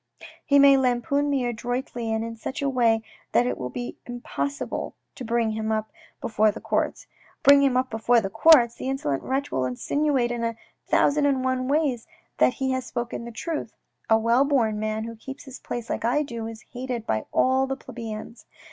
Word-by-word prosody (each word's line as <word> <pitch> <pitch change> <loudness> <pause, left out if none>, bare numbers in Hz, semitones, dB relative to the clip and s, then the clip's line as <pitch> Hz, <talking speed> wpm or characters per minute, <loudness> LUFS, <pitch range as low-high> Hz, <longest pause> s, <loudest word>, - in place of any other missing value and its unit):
He 280 - +3
may 280 -1 +7
lampoon 265 +3 +1
me 270 -3 +1
adroitly 240 0 -3
and 220 0 -1
in 230 0 -6
such 260 +5 -5
a - - +1
way 230 -4 +2 0.3
that 245 - +4
it 250 - -1
will 125 -1 -5
be 245 - -6
impossible 245 +3 -4 0.2
to 260 - -8
bring 230 -1 0
him 220 0 -2
up 215 0 -2 0.3
before 215 -1 +2
the 205 - -4
courts. - - -1 0.4
Bring 280 0 +8
him 270 -3 +3
up 255 0 0
before 230 +2 +3
the 195 -3 -4
courts! 245 -3 +6
The 260 - -5
insolent 145 - -1
wretch 270 +2 -2
will 130 - 0
insinuate 250 - 0
in 240 -1 -3
a 230 0 -1 0.3
thousand 290 0 +3
and 265 -2 +1
one 255 0 0
ways 280 -5 0 0.3
that 250 - +4
he 265 -1 -1
has 260 0 -1
spoken 240 -1 -4
the 235 - -7
truth. 310 +7 -4 0.3
A 220 - +6
well 230 +4 +3
born 235 -7 +1
man 215 0 -2
who 230 0 -6
keeps 270 +5 -9
his 265 -2 -10
place 240 -1 -5
like - - -3
I 255 +6 +2
do, 235 -5 -5
is 225 0 -9
hated 245 -2 -4
by 110 - -1
all 260 +1 +3
the 270 0 -3
plebeians. 230 -2 -8
245 Hz, 200 wpm, -25 LUFS, 225-270 Hz, 0.4 s, Bring